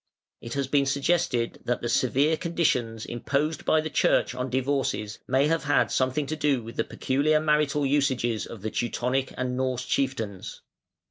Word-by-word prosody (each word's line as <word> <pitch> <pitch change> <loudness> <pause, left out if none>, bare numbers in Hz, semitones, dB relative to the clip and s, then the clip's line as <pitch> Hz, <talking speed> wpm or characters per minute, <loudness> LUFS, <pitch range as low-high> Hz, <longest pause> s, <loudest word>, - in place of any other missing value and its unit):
It 115 - -6
has 140 -1 0
been 140 +1 +2
suggested 140 -4 0
that 120 0 -1
the - - 0
severe 135 +6 +2
conditions 130 -10 -1
imposed 140 +6 -2
by 155 - +3
the 155 - -4
Church - - +2
on 125 +1 -3
divorces 130 -5 -1
may 135 +2 +3
have 165 0 0
had 145 - +2
something 130 +3 +1
to 155 - -3
do 145 -5 +1
with 115 +1 -9
the - - +2
peculiar 145 +4 +1
marital 150 -2 +1
usages 130 -5 +1
of 110 -4 -10
the 110 - -3
Teutonic 125 +3 -1
and 125 0 -2
Norse 130 -1 -1
chieftains. 115 -8 -2
135 Hz, 170 wpm, -26 LUFS, 120-150 Hz, -, by